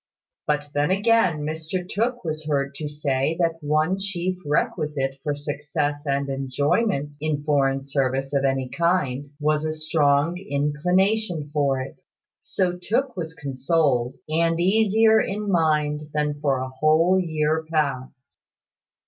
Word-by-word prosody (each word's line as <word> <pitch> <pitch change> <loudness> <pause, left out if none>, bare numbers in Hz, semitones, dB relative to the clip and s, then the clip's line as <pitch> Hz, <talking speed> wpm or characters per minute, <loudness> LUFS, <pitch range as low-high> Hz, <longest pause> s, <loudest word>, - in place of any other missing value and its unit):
But 150 -1 0
then 145 +2 +1
again, 195 -5 +3
Mr 160 +4 -4
Tooke 240 +5 -1
was 155 -1 -4
heard 140 -2 0
to 150 -2 -4
say 145 +1 -1
that 165 -1 0
one 155 +5 +1
chief 185 -2 -2
requisite 145 -2 -1
for 145 -2 -2
success 145 0 -3
and 140 0 0
enjoyment 140 - 0
in 150 -2 -1
foreign 135 -2 +1
service 135 0 -1
of 140 -1 +2
any 135 -1 +1
kind 145 -4 0
was 150 0 +1
a 155 - -1
strong 155 +1 +1
inclination 175 +2 0
for 140 -3 +1
it. 130 - -9 0.4
So 180 -2 -1
Tooke 240 +8 -1
was 160 -3 -5
consoled, 135 -3 0
and 165 +1 +1
easier 220 +4 +4
in 205 0 -2
mind 150 -3 +1
than 150 -1 0
for 140 -3 +2
a 130 - -4
whole 155 +7 +3
year 160 -1 0
past. 140 -3 -2
150 Hz, 135 wpm, -24 LUFS, 140-175 Hz, 0.4 s, easier